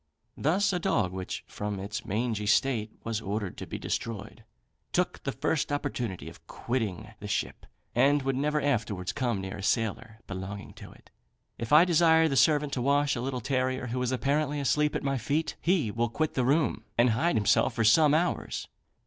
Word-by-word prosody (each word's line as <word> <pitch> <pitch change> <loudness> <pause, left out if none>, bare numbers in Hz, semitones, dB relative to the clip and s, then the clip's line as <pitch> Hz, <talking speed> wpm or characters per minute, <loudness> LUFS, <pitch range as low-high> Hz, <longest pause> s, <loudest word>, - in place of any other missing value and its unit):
Thus 190 +7 +1
a 180 - 0
dog, 105 - +1
which, 95 0 -5
from 105 -1 -5
its 105 +4 -5
mangy 105 0 -1
state, 110 0 +2
was 115 -1 -2
ordered 100 -2 -3
to - - -7
be - - -5
destroyed, 110 0 -5 0.5
took - - 0
the - - -2
first 150 -2 -1
opportunity 125 -9 -3
of - - -13
quitting 110 -3 -3
the 105 - -7
ship, - - -3 0.3
and 145 0 +3
would 135 0 0
never 150 +3 +1
afterwards 110 -10 -1
come 120 -7 -1
near 95 +1 -5
a - - -7
sailor 110 +1 -1
belonging 100 +1 -7
to - - -12
it. - - -20 0.5
If 115 -1 -5
I 155 +4 +8
desire 160 -2 +5
the 140 - -1
servant 150 0 +3
to 125 - -1
wash 140 +2 +2
a 120 - -3
little 130 -1 -3
terrier, 130 +1 -1
who 125 - -1
is 125 0 0
apparently 145 +3 0
asleep 150 +2 +1
at - - -2
my 135 -1 0
feet, 150 +7 -1
he 165 - +1
will 120 +2 0
quit 155 +6 -1
the 125 - 0
room, 145 +1 +1
and 120 0 +5
hide 165 +10 +1
himself 110 +3 +3
for 115 - +1
some 150 +7 +5
hours. 175 +2 -1
125 Hz, 190 wpm, -28 LUFS, 110-145 Hz, 0.5 s, I